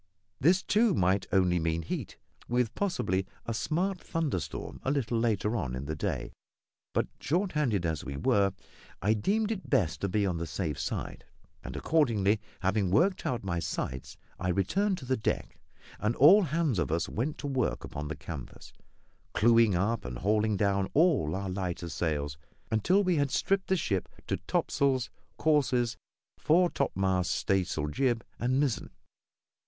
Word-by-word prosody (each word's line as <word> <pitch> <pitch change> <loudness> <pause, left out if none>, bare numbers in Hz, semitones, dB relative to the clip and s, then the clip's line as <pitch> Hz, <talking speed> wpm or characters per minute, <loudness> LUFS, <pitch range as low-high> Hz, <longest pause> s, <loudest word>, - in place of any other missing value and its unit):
This, 180 +6 +4
too, 215 -3 +3
might 95 +2 +2
only 90 -2 +3
mean 80 0 -1
heat, - - -5 0.3
with 120 -1 +1
possibly 95 - -1 0.2
a 115 - -2
smart 175 - -1
thunderstorm 150 - -3
a - - -2
little 125 -5 0
later 110 -1 +1
on 70 - -2
in 65 +2 -5
the 75 +1 -3
day; 75 - -3 0.6
but, - - 0
short 180 +6 0
handed 120 - 0
as 80 -3 -1
we 70 0 -5
were, 100 +6 +3 0.5
I 105 +2 +4
deemed 210 - 0
it 200 -4 -5
best 80 -8 +1
to 100 - 0
be 100 +2 +1
on 90 -3 -1
the 85 0 -3
safe 75 -2 -3
side; - - -4 0.4
and - - -7
accordingly, 110 -10 +2 0.2
having 95 0 +1
worked 185 - +2
out 120 -3 -2
my 85 -3 -1
sights, 65 -5 -4 0.2
I 90 - -2
returned 185 - +1
to 130 - -9
the 130 +1 +1
deck, 110 - -2 0.4
and 105 +3 0
all 185 +10 +8
hands 155 - 0
of 85 - -1
us 85 +1 0
went 135 +8 -2
to - - -7
work 135 -3 -1
upon 75 +1 -5
the 80 - -4
canvas, 75 -2 -9 0.6
clewing 115 -2 +5
up 105 +6 0
and 60 -1 -5
hauling 105 - +1
down 100 -1 +1
all 145 - +3
our 100 0 -3
lighter 90 -2 -3
sails, 75 -3 -2 0.3
until 175 - +3
we 180 -3 +2
had 140 -1 +2
stripped 195 +7 +1
the 190 - +2
ship 100 - -1 0.2
to - - -1
topsails, 130 -3 +1 0.3
courses, 130 -6 +2 0.4
fore 175 +3 +4
topmast 95 -8 0
staysail, 90 -6 0
jib, 120 - 0
and 130 +3 +1
mizzen. 140 -6 0
110 Hz, 165 wpm, -29 LUFS, 90-145 Hz, 0.6 s, all